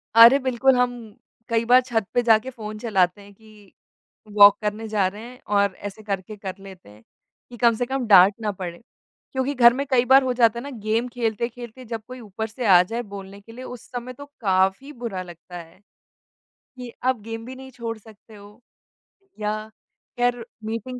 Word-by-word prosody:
अरे! 230 Hz, +4 st, +9 dB
बिल्कुल 260 Hz, 0 st, +2 dB
हम 250 Hz, 0 st, +2 dB, 0.6 s
कई 230 Hz, 0 st, +1 dB
बार 250 Hz, +2 st, +6 dB
छत 235 Hz, -4 st, -2 dB
पे 245 Hz, -, +3 dB
जाके 225 Hz, +1 st, +3 dB
फ़ोन 215 Hz, -4 st, -8 dB
चलाते 195 Hz, -4 st, 0 dB
हैं 200 Hz, 0 st, -15 dB
कि 210 Hz, -1 st, -20 dB, 0.6 s
वॉक 205 Hz, 0 st, +9 dB
करने 215 Hz, +1 st, -3 dB
जा 210 Hz, -3 st, +1 dB
रहे 205 Hz, +4 st, -8 dB
हैं, 250 Hz, +1 st, -12 dB
और 200 Hz, -2 st, +1 dB
ऐसे 205 Hz, +2 st, -9 dB
करके 200 Hz, +1 st, -4 dB
कर 190 Hz, -2 st, -6 dB
लेते 190 Hz, -, -13 dB
हैं, 105 Hz, +2 st, -18 dB, 0.5 s
कि 245 Hz, -, -11 dB
कम 235 Hz, -1 st, +3 dB
से 245 Hz, -, -2 dB
कम 265 Hz, 0 st, -3 dB
डाँट 195 Hz, -1 st, +7 dB
ना 210 Hz, -1 st, -1 dB
पड़े। 180 Hz, -2 st, -8 dB, 0.5 s
क्योंकि 265 Hz, +2 st, -1 dB
घर 240 Hz, -1 st, +7 dB
में 275 Hz, +2 st, -3 dB
कई 250 Hz, -2 st, +3 dB
बार 265 Hz, +1 st, +6 dB
हो 255 Hz, -, 0 dB
जाता 235 Hz, -1 st, +3 dB
है -, -, -8 dB
ना 285 Hz, -, -7 dB
गेम 220 Hz, +3 st, 0 dB
खेलते-खेलते 235 Hz, +1 st, -4 dB
जब 225 Hz, -1 st, -6 dB
कोई 255 Hz, 0 st, -9 dB
ऊपर 220 Hz, -1 st, -6 dB
से 235 Hz, +3 st, -6 dB
आ 180 Hz, -4 st, +7 dB
जाए 230 Hz, +6 st, -4 dB
बोलने 195 Hz, 0 st, -10 dB
के 225 Hz, +3 st, -15 dB
लिए 250 Hz, +3 st, -10 dB
उस 250 Hz, -3 st, -9 dB
समय 245 Hz, 0 st, -6 dB
तो 285 Hz, +3 st, -11 dB, 0.2 s
काफ़ी 190 Hz, +6 st, +1 dB
बुरा 230 Hz, -7 st, -5 dB
लगता 175 Hz, 0 st, -12 dB
है। 165 Hz, +2 st, -18 dB, 1.0 s
कि 250 Hz, -1 st, -8 dB
आप 255 Hz, -2 st, +1 dB
गेम 225 Hz, +1 st, -7 dB
भी 260 Hz, -, -9 dB
नहीं 265 Hz, 0 st, -11 dB
छोड़ 230 Hz, -2 st, -6 dB
सकते 220 Hz, 0 st, -17 dB
हो, 205 Hz, +2 st, -16 dB, 0.8 s
या 215 Hz, +1 st, -3 dB, 0.5 s
खैर 245 Hz, -1 st, 0 dB, 0.2 s
मीटिंग 230 Hz, +3 st, -5 dB
225 Hz, 195 wpm, -23 LUFS, 205-245 Hz, 1.0 s, अरे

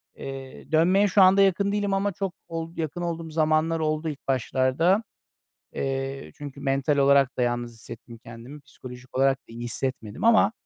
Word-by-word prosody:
Eee, 135 Hz, +1 st, -9 dB
dönmeye 180 Hz, +6 st, +4 dB
şu 200 Hz, +1 st, +4 dB
anda 190 Hz, +1 st, +6 dB
yakın 195 Hz, +1 st, +2 dB
değilim 205 Hz, -1 st, 0 dB
ama 195 Hz, +1 st, 0 dB
çok 195 Hz, 0 st, -4 dB
ol 165 Hz, 0 st, -6 dB
yakın 160 Hz, +1 st, -3 dB
olduğum 165 Hz, -1 st, -4 dB
zamanlar 155 Hz, +1 st, +1 dB
oldu 155 Hz, 0 st, -1 dB
ilk 145 Hz, -, -9 dB
başlarda. 135 Hz, -, +1 dB, 0.7 s
Eee, 135 Hz, 0 st, -4 dB
çünkü 145 Hz, -1 st, -9 dB
mental 135 Hz, +1 st, 0 dB
olarak 140 Hz, -1 st, +4 dB
da -, -, +2 dB
yalnız 120 Hz, 0 st, -1 dB
hissettim 115 Hz, +1 st, -11 dB
kendimi, 120 Hz, +6 st, -11 dB
psikolojik 130 Hz, -2 st, -12 dB
olarak 135 Hz, 0 st, +3 dB
da -, -, -74 dB
iyi 115 Hz, +1 st, -9 dB
hissetmedim 120 Hz, -, -4 dB
ama, 225 Hz, -2 st, +5 dB
145 Hz, 165 wpm, -25 LUFS, 130-170 Hz, 0.7 s, anda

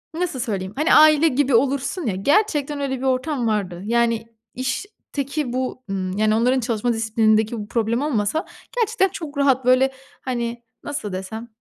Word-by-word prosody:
nasıl 335 Hz, -6 st, -2 dB
söyleyeyim, 200 Hz, -5 st, -3 dB
hani, 305 Hz, +3 st, +3 dB
aile 310 Hz, +1 st, +7 dB
gibi 275 Hz, -3 st, +2 dB
olursun 275 Hz, +7 st, 0 dB
ya, 210 Hz, -5 st, -1 dB
gerçekten 295 Hz, -, +1 dB
öyle 265 Hz, -1 st, -1 dB
bir 255 Hz, -, -7 dB
ortam 260 Hz, -1 st, 0 dB
vardı. 195 Hz, -5 st, -2 dB
Yani, 230 Hz, 0 st, +1 dB, 0.3 s
işteki 275 Hz, -, -4 dB
bu, 255 Hz, 0 st, -3 dB
ımm, 190 Hz, -1 st, -3 dB
yani, 215 Hz, 0 st, +3 dB
onların 250 Hz, +4 st, +2 dB
çalışma 235 Hz, 0 st, 0 dB
disiplinindeki 220 Hz, 0 st, +2 dB
bu 205 Hz, -, -6 dB
problem 230 Hz, +2 st, 0 dB
olmasa 290 Hz, -, 0 dB, 0.3 s
gerçekten 445 Hz, -4 st, +2 dB
çok 315 Hz, -6 st, -7 dB
rahat, 270 Hz, -3 st, +2 dB
böyle, 255 Hz, +1 st, +4 dB, 0.3 s
hani, 240 Hz, -2 st, -3 dB, 0.2 s
nasıl 280 Hz, -9 st, -5 dB
desem, 205 Hz, +5 st, -6 dB
250 Hz, 155 wpm, -22 LUFS, 220-285 Hz, 0.3 s, aile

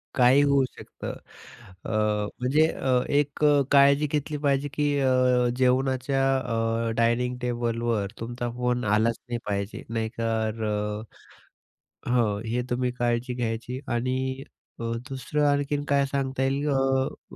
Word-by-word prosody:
काहीही 130 Hz, +2 st, +5 dB
होऊ 140 Hz, -1 st, +4 dB
शकतं, -, -, -8 dB, 0.7 s
अ, -, -, -4 dB, 0.5 s
म्हणजे 145 Hz, +6 st, +3 dB
अ, 130 Hz, -, -4 dB, 0.2 s
एक 145 Hz, +1 st, 0 dB
अ, 145 Hz, -1 st, +5 dB
काळजी 140 Hz, +1 st, +5 dB
घेतली 150 Hz, 0 st, -1 dB
पाहिजे 140 Hz, +1 st, +2 dB
की 150 Hz, -, 0 dB
अ, 125 Hz, -2 st, +3 dB
जेवणाच्या 130 Hz, +1 st, +1 dB
अ, 115 Hz, -2 st, -1 dB
डायनिंग 120 Hz, +2 st, +1 dB
टेबलवर 115 Hz, -4 st, -1 dB
तुमचा 120 Hz, +1 st, -4 dB
फोन 125 Hz, 0 st, 0 dB
आलाच 110 Hz, +2 st, +2 dB
नाही 120 Hz, -, -2 dB
पाहिजे 100 Hz, 0 st, -3 dB
नाही 115 Hz, -1 st, -2 dB
तर 110 Hz, -1 st, -1 dB
अ 105 Hz, +1 st, -4 dB, 0.9 s
हो, 110 Hz, -5 st, +2 dB
हे 120 Hz, +2 st, -1 dB
तुम्ही 125 Hz, 0 st, 0 dB
काळजी 120 Hz, +1 st, 0 dB
घ्यायची 120 Hz, +1 st, -3 dB
आणि 130 Hz, +2 st, -1 dB, 0.4 s
अ, -, -, -5 dB, 0.3 s
दुसरं 140 Hz, +3 st, -1 dB
आणखीन 145 Hz, 0 st, 0 dB
काय 140 Hz, -1 st, +3 dB
सांगता 135 Hz, -1 st, -1 dB
येईल? 140 Hz, +2 st, 0 dB
अ 135 Hz, -1 st, -1 dB
125 Hz, 130 wpm, -26 LUFS, 115-135 Hz, 0.9 s, काहीही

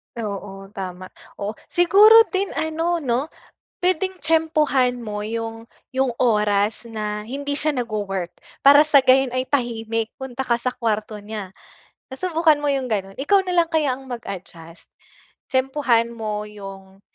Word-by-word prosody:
Oo, 200 Hz, -3 st, -6 dB
tama. 185 Hz, -2 st, -7 dB, 0.2 s
Oo. 200 Hz, +1 st, -4 dB, 0.2 s
Siguro 415 Hz, +6 st, +7 dB
din 390 Hz, +1 st, 0 dB
ano, 325 Hz, +1 st, -1 dB
'no? 255 Hz, +3 st, 0 dB, 0.5 s
Pwedeng 370 Hz, +1 st, 0 dB
tiyempuhan 305 Hz, -6 st, +2 dB
mo 210 Hz, -3 st, -5 dB
'yung 225 Hz, +1 st, -5 dB, 0.2 s
'yung 265 Hz, -1 st, +1 dB
oras 210 Hz, -3 st, +2 dB
na 210 Hz, -1 st, -4 dB
hindi 280 Hz, +6 st, -4 dB
siya 305 Hz, +2 st, +4 dB
nagwo-work. 205 Hz, -, -3 dB, 0.2 s
Para 285 Hz, +1 st, +7 dB
sa 305 Hz, -2 st, +5 dB
gayon 260 Hz, 0 st, +5 dB
ay 255 Hz, +1 st, -2 dB
tahimik, 225 Hz, -4 st, -1 dB
punta 265 Hz, -1 st, -5 dB
ka 240 Hz, -2 st, 0 dB
sa 255 Hz, +1 st, -2 dB
kwarto 215 Hz, -2 st, -3 dB
niya. 205 Hz, -3 st, -7 dB, 0.6 s
Nasubukan 320 Hz, 0 st, +2 dB
mo 290 Hz, -, -1 dB
'yung 265 Hz, -4 st, -1 dB
gano'n? 195 Hz, -2 st, -3 dB
Ikaw 340 Hz, +9 st, +3 dB
na 365 Hz, -2 st, -3 dB
lang 335 Hz, -1 st, +2 dB
kaya 295 Hz, -5 st, +1 dB
ang 270 Hz, -, -13 dB
mag-adjust? 185 Hz, -9 st, -9 dB, 0.6 s
Tiyempuhan 260 Hz, -4 st, +1 dB
mo 215 Hz, -2 st, -4 dB
'yung 195 Hz, -2 st, -11 dB
240 Hz, 140 wpm, -22 LUFS, 210-290 Hz, 0.6 s, Siguro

